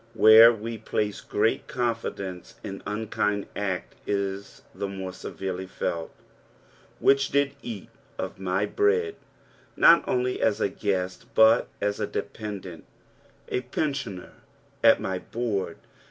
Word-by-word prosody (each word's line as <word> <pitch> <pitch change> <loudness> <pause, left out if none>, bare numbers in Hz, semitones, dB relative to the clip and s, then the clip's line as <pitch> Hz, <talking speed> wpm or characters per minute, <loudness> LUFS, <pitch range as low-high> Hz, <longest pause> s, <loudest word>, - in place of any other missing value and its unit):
Where 110 +2 +9
we 115 0 -5
place 105 -1 -2
great 110 +2 0
confidence 115 -6 -3
an 100 -1 -6
unkind 105 -1 -1
act 95 -4 -3
is 100 0 -3
the 100 - -3
more 95 -1 -6
severely 95 0 -5
felt. 85 -2 -3 0.5
" - - -30
Which 135 0 +4
did 140 -1 +2
eat 110 -6 -7 0.3
^ - - -4
my 95 +2 0
bread." 420 - +1 0.6
Not 170 -2 +7
only 125 0 0
as 110 -2 +2
a - - +1
guest 95 -2 -2
but 110 +1 +6
as 105 0 -1
a - - -1
dependant, 95 -6 -6 0.6
a - - -1
pensioner 130 - -3 0.5
at - - +7
my 95 -1 -2
board. 110 -2 -3
105 Hz, 125 wpm, -26 LUFS, 95-115 Hz, 0.6 s, Where